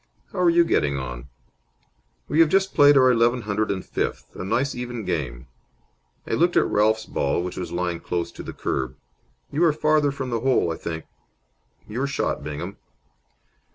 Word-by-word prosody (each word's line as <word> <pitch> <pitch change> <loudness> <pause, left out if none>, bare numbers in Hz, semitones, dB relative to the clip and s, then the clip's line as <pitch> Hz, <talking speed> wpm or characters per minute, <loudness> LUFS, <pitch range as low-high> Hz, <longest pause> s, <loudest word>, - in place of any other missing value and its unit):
How - - -4
are 180 -1 +5
you 170 0 +5
getting 70 - +1
on?" 60 0 -6 1.0
"We 155 - 0
have 165 -2 +6
just 190 +2 +2
played 145 -1 +7
our 130 -1 +6
eleven 120 +1 +3
hundred 105 +1 -1
and 95 -2 -2
fifth. - - -4
A - - -5
nice 120 +8 0
even 120 -3 -5
game." 70 -9 -3 0.8
I - - -7
looked 175 +2 +3
at - - +5
Ralph's 110 +1 +2
ball, 70 0 -1
which 90 - -5
was 90 -2 -5
lying 85 -1 -2
close 85 -1 -3
to - - -9
the - - -7
kerb. 65 -1 -3 0.6
"You 160 - +1
are 165 - +5
farther 155 -1 +2
from 130 -2 -5
the 115 - 0
hole, 125 -9 +2
I - - -5
think. 80 -1 -5 0.8
Your 125 +6 -2
shot, 140 - -2
Bingham." 80 +6 -5
110 Hz, 180 wpm, -24 LUFS, 85-140 Hz, 1.0 s, played